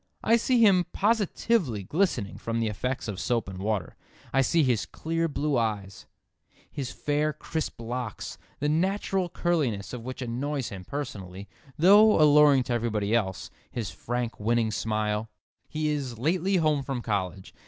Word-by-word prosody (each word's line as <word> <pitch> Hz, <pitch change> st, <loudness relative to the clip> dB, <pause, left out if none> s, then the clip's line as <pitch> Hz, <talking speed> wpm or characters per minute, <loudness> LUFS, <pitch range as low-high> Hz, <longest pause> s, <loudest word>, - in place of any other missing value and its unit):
I 230 Hz, -, +5 dB
see 240 Hz, +1 st, +2 dB
him 195 Hz, -5 st, +5 dB
positively 205 Hz, -, +1 dB
glistening 135 Hz, -, -1 dB
from 115 Hz, 0 st, -2 dB
the 115 Hz, -, +1 dB
effects 125 Hz, +5 st, -3 dB
of 100 Hz, -3 st, -4 dB
soap 115 Hz, -2 st, 0 dB
and 95 Hz, -1 st, -7 dB
water. 100 Hz, -4 st, -2 dB, 0.4 s
I 135 Hz, -, +4 dB
see 160 Hz, +5 st, +3 dB
his 120 Hz, -7 st, +1 dB
clear 165 Hz, +1 st, -2 dB
blue 145 Hz, -3 st, 0 dB
eye; 105 Hz, -4 st, -1 dB, 0.8 s
his 135 Hz, -3 st, -4 dB
fair 150 Hz, +1 st, 0 dB
crisp 160 Hz, -1 st, -4 dB
locks, 120 Hz, -1 st, -5 dB, 0.2 s
the 145 Hz, -, -1 dB
natural 185 Hz, +3 st, 0 dB
curliness 145 Hz, -, -1 dB
of 125 Hz, -, -5 dB
which 130 Hz, +2 st, -6 dB
annoys 130 Hz, +3 st, -2 dB
him 95 Hz, -2 st, -8 dB
personally, 100 Hz, -9 st, -6 dB, 0.3 s
though 205 Hz, +5 st, +7 dB
alluring 150 Hz, -3 st, +6 dB
to 120 Hz, -, -2 dB
everybody 110 Hz, -3 st, -1 dB
else; 95 Hz, -5 st, -1 dB, 0.2 s
his 110 Hz, -7 st, -4 dB
frank 120 Hz, +5 st, -4 dB
winning 115 Hz, +1 st, +1 dB
smile. 105 Hz, 0 st, -1 dB, 0.4 s
He 155 Hz, 0 st, -1 dB
is 135 Hz, -6 st, -3 dB
"lately 175 Hz, -, +1 dB
home 155 Hz, -5 st, +2 dB
from 135 Hz, -3 st, -4 dB
college." 95 Hz, -3 st, -3 dB
125 Hz, 155 wpm, -27 LUFS, 110-155 Hz, 0.8 s, though